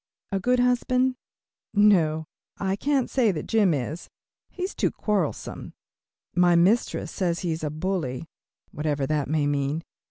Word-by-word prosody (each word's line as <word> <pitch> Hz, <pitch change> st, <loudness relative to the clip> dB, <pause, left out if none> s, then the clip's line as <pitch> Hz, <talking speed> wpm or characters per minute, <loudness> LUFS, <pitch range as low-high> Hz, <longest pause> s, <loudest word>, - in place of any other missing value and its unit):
A 195 Hz, -, 0 dB
good 250 Hz, +5 st, +2 dB
husband? 250 Hz, +1 st, +2 dB, 0.6 s
No, 170 Hz, -7 st, +4 dB, 0.3 s
I 195 Hz, -1 st, 0 dB
can't 275 Hz, +3 st, +1 dB
say 240 Hz, -6 st, +2 dB
that 155 Hz, -, -4 dB
Jim 210 Hz, -5 st, +3 dB
is. 150 Hz, +4 st, -3 dB, 0.4 s
He 365 Hz, -, -6 dB
is 380 Hz, -, -2 dB
too -, -, +1 dB
quarrelsome. 200 Hz, -8 st, -2 dB, 0.6 s
My 175 Hz, -1 st, +4 dB
mistress 190 Hz, +8 st, +2 dB
says 175 Hz, -3 st, -1 dB
he 175 Hz, -, -1 dB
is 160 Hz, 0 st, -4 dB
a 150 Hz, -, 0 dB
bully, 155 Hz, -4 st, -3 dB, 0.4 s
whatever 145 Hz, -2 st, -1 dB
that 150 Hz, -1 st, 0 dB
may 155 Hz, -1 st, +1 dB
mean. 145 Hz, +2 st, -1 dB
175 Hz, 150 wpm, -25 LUFS, 155-215 Hz, 0.6 s, No